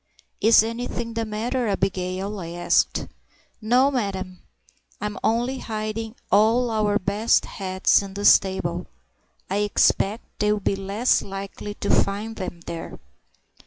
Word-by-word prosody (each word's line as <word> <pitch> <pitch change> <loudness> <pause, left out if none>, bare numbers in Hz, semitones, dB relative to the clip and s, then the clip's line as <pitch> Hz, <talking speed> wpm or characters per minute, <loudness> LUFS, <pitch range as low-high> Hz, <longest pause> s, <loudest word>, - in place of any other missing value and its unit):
"Is 220 -1 +7
anything 230 0 -4
the 230 0 -2
matter, 230 +3 -2
Abigail?" 195 0 -2
I 170 - -6
asked. 175 0 +1 0.6
"No'm! 255 +5 +3
I'm 200 0 -6
only 240 +4 0
hiding 220 +1 -4 0.2
all 225 +5 +4
our 210 -2 +2
best 205 +4 +2
hats 190 -1 +1
in 195 -1 -9
the 205 0 -3
stable; 180 -3 +3 0.6
I 195 - -1
expect 205 +1 +2 0.2
they'll 210 0 +2
be 200 - 0
less 200 +5 +1
likely 195 +1 -7
to 200 - -2
find 210 +3 +1
them 185 -4 -6
there." 170 0 -7
210 Hz, 125 wpm, -24 LUFS, 195-225 Hz, 0.6 s, Is